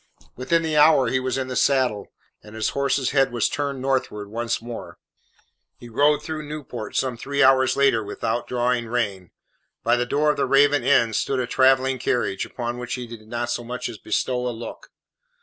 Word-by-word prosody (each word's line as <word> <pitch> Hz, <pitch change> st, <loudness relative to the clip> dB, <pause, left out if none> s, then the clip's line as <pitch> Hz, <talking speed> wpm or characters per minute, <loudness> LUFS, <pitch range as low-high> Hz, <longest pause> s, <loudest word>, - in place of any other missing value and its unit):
Within 165 Hz, +7 st, +1 dB
the 160 Hz, -1 st, -1 dB
hour 150 Hz, -3 st, +5 dB
he 130 Hz, -, +1 dB
was 130 Hz, 0 st, -2 dB
in 130 Hz, -1 st, -2 dB
the 130 Hz, -, -5 dB
saddle, 130 Hz, -8 st, +1 dB, 0.3 s
and 105 Hz, +1 st, -13 dB
his 110 Hz, -, 0 dB
horse's 140 Hz, -1 st, 0 dB
head 135 Hz, -2 st, +3 dB
was 120 Hz, -2 st, +1 dB
turned 140 Hz, -3 st, -3 dB
northwards 115 Hz, -6 st, -2 dB
once 115 Hz, +1 st, -2 dB
more. 120 Hz, 0 st, -8 dB, 0.8 s
He 120 Hz, -, -12 dB
rode 145 Hz, +5 st, +2 dB
through 155 Hz, 0 st, -4 dB
Newport 135 Hz, -7 st, -7 dB
some 130 Hz, -2 st, 0 dB
three 140 Hz, +4 st, 0 dB
hours 130 Hz, 0 st, +4 dB
later 135 Hz, -5 st, +3 dB
without 115 Hz, +3 st, -3 dB
drawing 125 Hz, -1 st, 0 dB
rein. 100 Hz, -6 st, -2 dB, 0.5 s
By -, -, +3 dB
the 120 Hz, 0 st, -1 dB
door 150 Hz, +3 st, +2 dB
of -, -, -5 dB
the -, -, +1 dB
Raven 145 Hz, -1 st, +4 dB
Inn 120 Hz, -4 st, +3 dB
stood 135 Hz, +4 st, 0 dB
a 125 Hz, -, 0 dB
travelling 130 Hz, +1 st, +3 dB
carriage, 120 Hz, -5 st, -1 dB
upon 120 Hz, 0 st, -5 dB
which 125 Hz, -1 st, -4 dB
he 125 Hz, -1 st, -6 dB
did 115 Hz, -2 st, -11 dB
not 120 Hz, +1 st, -3 dB
so 120 Hz, -, -2 dB
much 125 Hz, +1 st, -4 dB
as 110 Hz, -3 st, -9 dB
bestow 125 Hz, +3 st, -1 dB
a -, -, 0 dB
look. 115 Hz, -1 st, -8 dB
125 Hz, 195 wpm, -23 LUFS, 120-135 Hz, 0.8 s, hour